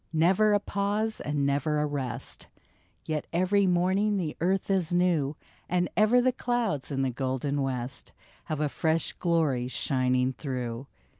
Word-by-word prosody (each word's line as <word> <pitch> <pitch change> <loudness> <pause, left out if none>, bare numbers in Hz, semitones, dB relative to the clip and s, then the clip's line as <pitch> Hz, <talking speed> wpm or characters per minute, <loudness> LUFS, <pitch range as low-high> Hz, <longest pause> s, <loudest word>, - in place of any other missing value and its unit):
" - - -39
Never 190 +7 +4
a 205 - +4
pause 205 +2 -1
and 145 -1 0
never 145 +2 +1
a 150 - +1
rest; 135 -5 -4 0.6
Yet 155 -1 -2
every 190 +3 +2
morning 190 +4 +2
the 165 -5 -2
earth 190 +3 +1
is 185 -4 +2
new, 170 -5 +2 0.3
And 180 0 +1
ever 215 +4 +5
the 255 +1 +3
clouds 240 - -1
in 135 -2 -1
the 130 - 0
golden 135 +3 -2
west 130 -1 -3 0.3
Have 155 -3 -3
a 150 - +1
fresh 160 +3 0
glory 155 -8 +1
shining 130 0 +1
through." 125 -2 -4
160 Hz, 155 wpm, -28 LUFS, 135-190 Hz, 0.6 s, ever